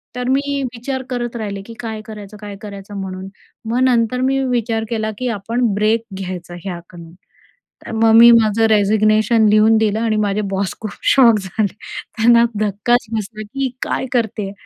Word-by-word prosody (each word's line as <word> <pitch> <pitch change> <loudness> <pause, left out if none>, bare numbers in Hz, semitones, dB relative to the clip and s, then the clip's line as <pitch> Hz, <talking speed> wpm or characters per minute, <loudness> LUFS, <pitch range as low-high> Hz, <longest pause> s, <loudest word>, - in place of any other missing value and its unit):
तर 250 0 -3
मी 280 +1 0
विचार 260 +2 -4
करत 240 -1 -3
राहिले 200 -3 -4
की 230 - -10
काय 220 -2 -5
करायचं, 210 -1 -10
काय 205 -1 -7
करायचं 200 -1 -9
म्हणून. 190 0 -6 0.4
मग 240 +2 0
नंतर 250 0 +2
मी 270 +1 +1
विचार 230 -2 -1
केला 220 -1 -2
की 255 - -3
आपण 230 +1 -1
ब्रेक 220 +2 +1
घ्यायचा 180 -2 -6
ह्याकडून. 170 -2 -9 0.7
तर - - -7
मग 225 0 +3
मी 235 +1 +9
माझं 225 -1 +4
रेजिग्नेशन 215 +1 +3
लिहून 215 +1 +5
दिलं 220 0 +1
आणि 225 -2 0
माझे 205 +1 0
बॉस 195 0 -2
खूप 215 - -5 0.2
शॉक 235 -5 +6
झाले, 195 +2 -2 0.4
त्यांना 235 +1 +5 0.2
धक्काच 215 +4 +1
बसला 215 0 -4
की 270 +4 -3
काय - - -2
करते. 220 -5 -1
220 Hz, 165 wpm, -18 LUFS, 205-235 Hz, 0.7 s, मी